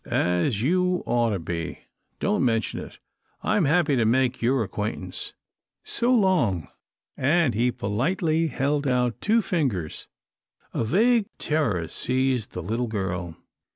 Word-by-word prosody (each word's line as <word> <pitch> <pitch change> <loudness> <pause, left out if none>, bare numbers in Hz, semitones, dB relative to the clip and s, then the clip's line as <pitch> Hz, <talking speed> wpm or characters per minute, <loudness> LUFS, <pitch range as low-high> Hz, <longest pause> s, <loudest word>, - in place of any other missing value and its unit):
"As 90 +6 +1
you 180 +4 +1
ought 120 -1 +2
to 105 - 0
be," 85 0 -5
he - - -6
finished. - - -26 0.3
"Don't - - +1
mention 115 -3 0
it. - - -9 0.5
I'm 195 - +2
happy 150 -1 +3
to 120 - +3
make 125 +3 +2
your 120 +1 +2
acquaintance. 100 -3 -4 0.5
So 240 +2 +1
long," 175 - +2 0.5
and 145 -1 +2
he 120 +3 +2
politely 155 - 0
held 140 +1 0
out 125 -2 0
two 225 +1 +3
fingers. 125 - -2 0.7
A - - 0
vague 215 - +3
terror 115 - 0
seized 130 0 0
the - - -5
little 115 +7 -1
girl. 90 -6 -3
125 Hz, 140 wpm, -25 LUFS, 105-160 Hz, 0.7 s, happy